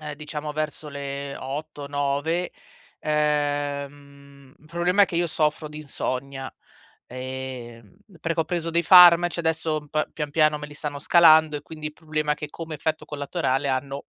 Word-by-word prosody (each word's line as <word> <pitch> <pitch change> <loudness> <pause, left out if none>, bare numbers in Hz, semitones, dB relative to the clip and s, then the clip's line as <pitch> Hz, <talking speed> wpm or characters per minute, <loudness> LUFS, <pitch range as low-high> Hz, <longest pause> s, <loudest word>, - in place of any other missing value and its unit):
ehm, 150 -1 -6
diciamo, 150 0 -6
verso 155 0 -4
le 140 -1 -5
8-9. 145 +3 -2 0.5
Ehm, 145 -2 -2
il 150 - -25
problema 175 +5 +2
è - - +8
che 175 - -5
io 175 0 +2
soffro 155 -1 0
di 150 - -11
insonnia, 135 -1 -4 0.6
ehm, 125 -4 -7 0.3
perché 165 0 -1
ho - - +1
preso 170 0 -2
dei 170 +1 +2
farmaci, 175 0 +8
adesso 160 -2 -1
p 155 0 -1
pian 150 -2 -3
piano 155 0 +3
me 150 - -7
li 150 - -13
stanno 145 -1 -5
scalando 160 -1 +6
e, - - -15
quindi, 155 -1 -8
il 150 - -13
problema 155 -1 -2
è - - 0
che 150 - -7
come 160 +1 -7
effetto 155 +1 -2
collaterale 140 -2 -1
hanno- 135 +1 -2
150 Hz, 160 wpm, -24 LUFS, 140-160 Hz, 0.6 s, è